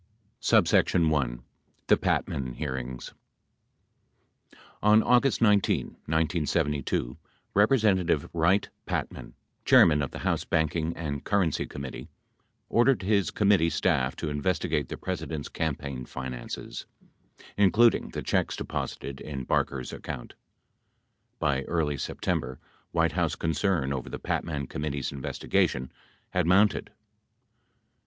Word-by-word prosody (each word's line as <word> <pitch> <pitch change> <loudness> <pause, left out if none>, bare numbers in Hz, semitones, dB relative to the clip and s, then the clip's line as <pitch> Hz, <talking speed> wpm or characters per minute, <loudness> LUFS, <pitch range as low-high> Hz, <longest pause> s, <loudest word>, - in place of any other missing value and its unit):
1. 70 -8 +3 0.4
THE - - +5
PATMAN 65 -3 -1
HEARINGS 65 -3 -5 1.7
On 105 +1 +5
August 125 0 +3
19, 105 -3 +3 0.2
1972, 75 -5 0 0.4
Representative 100 - +3
Wright 85 +4 +2 0.2
Patman, - - -4 0.3
Chairman 75 -3 +6
of 70 - -2
the - - -8
House - - +1
Banking 80 +1 0
and 70 -4 -4
Currency 95 -7 +1
Committee, 70 -2 -7 0.6
ordered 120 -4 +3
his 100 -1 +2
committee 100 -5 +3
staff 75 -5 +1
to 75 - -4
investigate 75 -1 -1
the - - -5
President's 80 -5 -4
campaign 70 -5 -3
finances, 65 -2 -6 0.7
including 110 +4 +4
the - - -5
checks - - 0
deposited 70 -1 -5
in 70 -3 -5
Barker's 65 0 -1
account. - - -7 1.0
By 70 -2 +1
early 75 -4 0
September, 65 0 -2 0.3
White - - +2
House - - 0
concern 80 -3 0
over 65 -2 -5
the - - -5
Patman 70 -4 -2
Committee's 70 -1 -3
investigation 65 -1 -1 0.4
had 90 -2 +1
mounted. 100 +3 +3
80 Hz, 105 wpm, -27 LUFS, 70-95 Hz, 1.7 s, Chairman